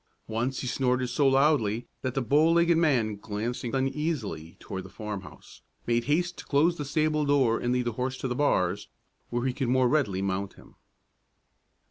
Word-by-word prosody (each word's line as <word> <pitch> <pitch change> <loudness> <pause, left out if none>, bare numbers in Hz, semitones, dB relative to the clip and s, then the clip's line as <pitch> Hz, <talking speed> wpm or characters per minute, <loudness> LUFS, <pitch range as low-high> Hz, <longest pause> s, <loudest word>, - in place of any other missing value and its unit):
Once 120 +4 -2
he - - -5
snorted 125 0 0
so 140 +3 +2
loudly 135 -5 +2 0.2
that 130 -1 -3
the 135 - 0
bow 150 +7 +4
legged 170 0 +4
man, 125 -11 +2
glancing 115 +5 -4
uneasily 135 - -2
toward 95 -1 -6
the - - -11
farmhouse, 105 -4 -8 0.2
made 120 0 +1
haste 175 +5 0
to - - -9
close 155 +5 +3
the 145 - -4
stable 155 +1 +1
door 135 -5 +3
and 120 - -1
lead 125 0 +1
the 120 - 0
horse 130 +3 -3
to 130 - -3
the 125 - -1
bars, 120 -10 +1 0.4
where 120 +1 -2
he 130 - 0
could 125 -1 -2
more 130 0 +3
readily 115 -10 +1
mount 95 0 -2
him. - - -18
125 Hz, 180 wpm, -27 LUFS, 115-145 Hz, 0.4 s, bow